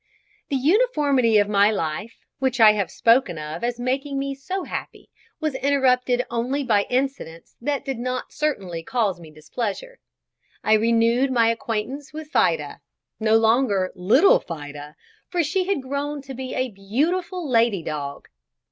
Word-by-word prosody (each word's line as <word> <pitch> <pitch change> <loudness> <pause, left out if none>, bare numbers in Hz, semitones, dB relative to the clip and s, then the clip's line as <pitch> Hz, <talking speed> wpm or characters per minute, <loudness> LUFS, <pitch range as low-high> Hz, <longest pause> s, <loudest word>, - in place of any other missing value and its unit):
The 280 - -1
uniformity 285 - +3
of 205 -1 +3
my 205 0 +4
life, 205 +2 -4
which 260 -2 0
I 220 -1 +9
have 205 -3 -1
spoken 230 -7 +2
of 155 +7 -6
as 240 0 -2
making 270 +3 -2
me 275 0 -2
so 370 +8 -4
happy, - - -7 0.3
was 310 -3 -1
interrupted 255 -2 +2
only 250 +5 -2
by 210 -5 +2
incidents 255 -10 -3
that 285 +2 -2
did 270 -4 -3
not 255 +1 -4
certainly 195 - -2
cause 200 -2 -1
me 165 -2 -12
displeasure. 205 - -5 0.6
I 215 - +3
renewed 230 +4 +3
my 230 -3 +3
acquaintance 230 +5 -4
with 310 0 -8
"Fida," - - +1 0.4
no 220 0 +4
longer 220 -4 +2
little 225 - +4
Fida, 145 -2 -8 0.3
for 350 -2 +1
she 365 +5 0
had 370 -8 -1
grown 280 +2 -3
to 270 -1 -8
be 260 0 -6
a 255 -1 -1
beautiful 315 - -2
lady 230 -7 +2
dog. 140 -2 -5
245 Hz, 150 wpm, -23 LUFS, 210-275 Hz, 0.6 s, I